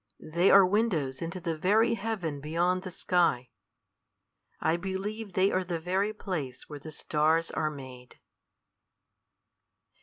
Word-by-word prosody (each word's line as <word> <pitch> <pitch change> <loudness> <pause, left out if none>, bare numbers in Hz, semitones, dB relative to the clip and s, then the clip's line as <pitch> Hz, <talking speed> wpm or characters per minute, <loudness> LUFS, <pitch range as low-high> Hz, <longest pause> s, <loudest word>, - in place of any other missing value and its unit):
They 170 +4 +1
are 195 -1 +8
windows 180 - 0
into 170 +2 -4
the 165 -2 -2
very 215 +8 +3
heaven 195 -9 -3
beyond 175 +5 0
the 185 - -6
sky. 170 -8 +1 1.1
I 160 - +2
believe 195 +3 -4
they 190 +2 +3
are 185 - +1
the 175 -2 -3
very 190 +5 0
place 160 - -5
where 150 -1 -8
the 155 - -9
stars 155 +2 +1
are 155 - -1
made." 130 -4 -11
175 Hz, 130 wpm, -29 LUFS, 155-195 Hz, 1.1 s, are